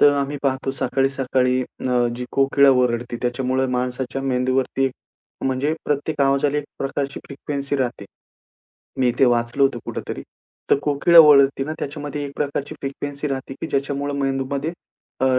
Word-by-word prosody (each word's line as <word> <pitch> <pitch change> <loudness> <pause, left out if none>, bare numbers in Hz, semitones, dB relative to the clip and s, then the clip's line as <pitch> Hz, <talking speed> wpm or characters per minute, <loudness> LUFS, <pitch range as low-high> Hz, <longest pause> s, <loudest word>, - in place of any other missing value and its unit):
तर 145 - +7
आम्ही 140 +1 -1
पाहतो 135 -1 0
सकाळी-सकाळी 130 -1 +1 0.3
न - - 0 0.2
अ, 120 - +2
जी 125 - -4
कोकिळा 140 0 +5
ओरडते 120 -2 +1
त्याच्यामुळे 130 +2 0
माणसाच्या 125 +2 -3
मेंदूवरती 130 0 0
एक 135 - +1 0.5
म्हणजे 135 +4 0
प्रत्येक 145 +1 -1
आवाजाला 140 +1 +2
एक 145 - -4
प्रकारची 140 0 -3
फ्रिक्वेन्सी 140 0 -4
राहते. 125 -6 -2 1.0
मी 125 -2 +4
ते 135 - +6
वाचलं 120 +2 +1
होतं 135 -3 +3
कुठेतरी. - - -5 0.5
तर - - +5
कोकिळा 150 +4 +4
ओरडते 140 -3 +7
ना 155 - -4
त्याच्यामध्ये 145 0 -4
एक 140 - -6
प्रकारची 145 -1 -3
फ्रिक्वेन्सी 140 +1 -4
राहते, 135 -1 -4
की - - -3
ज्याच्यामुळे 140 0 -2
मेंदूमध्ये 135 +3 -1 0.5
अ, - - +3
135 Hz, 150 wpm, -22 LUFS, 130-140 Hz, 1.0 s, तर